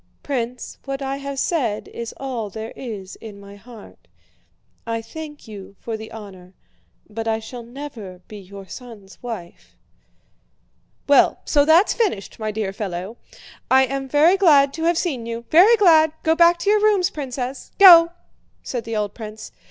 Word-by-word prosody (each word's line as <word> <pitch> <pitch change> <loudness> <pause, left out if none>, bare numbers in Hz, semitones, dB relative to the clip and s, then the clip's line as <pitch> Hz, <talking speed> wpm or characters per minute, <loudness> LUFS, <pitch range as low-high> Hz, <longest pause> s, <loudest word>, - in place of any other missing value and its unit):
'" - - -43
"Prince, 250 -3 -4
what 275 0 -4
I 270 0 -3
have 280 0 -6
said 255 -9 -1
is 235 -1 -7
all 245 -6 -4
there 220 +3 -7
is 205 -7 -8
in 210 -3 -11
my 200 0 -13
heart. 220 +1 -15 0.8
I 230 0 -2
thank 295 +5 -10
you 200 -2 -11
for 230 - -5
the 220 0 -9
honor, 190 -4 -12 0.5
but 225 +1 -6
I 220 0 +1
shall 225 +2 -9
never 235 -7 -9
be 210 - -10
your 195 0 -11
son's 220 -6 -12
wife." 220 -8 -9 1.3
"Well, 285 - +4
so 285 -2 +3
that's 330 +6 +5
finished, 390 - -2
my 215 -1 -3
dear 210 -2 -3
fellow! 195 +1 -5 0.5
I 265 0 +5
am 270 +1 -4
very 315 +7 +4
glad 285 -7 +5
to 325 +1 -3
have 340 0 +2
seen 265 -10 -2
you. 230 0 -6
Very 395 +9 +7
glad! 320 -6 +5
Go 320 - +3
back 340 +1 +5
to 405 - 0
your 425 0 +3
rooms, 405 -4 +3
Princess. 265 -2 -6
Go!" 340 -4 +9 0.5
said 245 -3 -5
the 225 0 -4
old 210 -2 -2
prince. 215 -1 -9
240 Hz, 170 wpm, -21 LUFS, 215-295 Hz, 1.3 s, Go